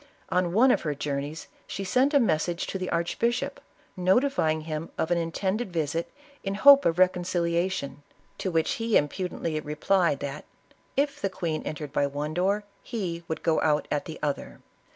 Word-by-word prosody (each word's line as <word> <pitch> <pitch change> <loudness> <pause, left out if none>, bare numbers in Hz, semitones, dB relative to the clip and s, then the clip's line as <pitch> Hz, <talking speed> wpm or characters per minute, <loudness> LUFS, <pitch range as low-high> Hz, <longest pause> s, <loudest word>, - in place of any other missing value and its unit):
On 180 -1 +1
one 245 +8 +5
of - - +2
her 150 -3 -2
journeys, 145 +2 -4 0.2
she 195 - -4
sent 260 +9 +2
a - - +7
message 170 - +1
to 195 - -4
the 185 - -3
archbishop, 200 +8 -1 0.4
notifying 185 - +2
him 155 +1 -4
of 160 - -1
an 175 - +3
intended 190 +6 -2
visit 165 0 -1 0.3
in 195 0 -2
hope 280 +5 +8
of 165 - +2
reconciliation, 175 -5 +1 0.4
to 190 - -1
which 165 +3 0
lie 225 -1 +3
impudently 165 0 -2
replied, 155 +1 +1
that 145 +1 -5 0.3
" - - -37
if 280 - -16
the 195 - 0
queen 170 -5 -3
entered 150 -2 -5
by 140 - +2
one 145 +2 -4
door 195 +5 +1 0.2
he 180 -7 -4
would 160 - -4
go 160 - +2
out 150 -1 +2
at 145 - 0
the 160 - -7
other." 145 -2 -3
170 Hz, 175 wpm, -27 LUFS, 155-195 Hz, 0.4 s, hope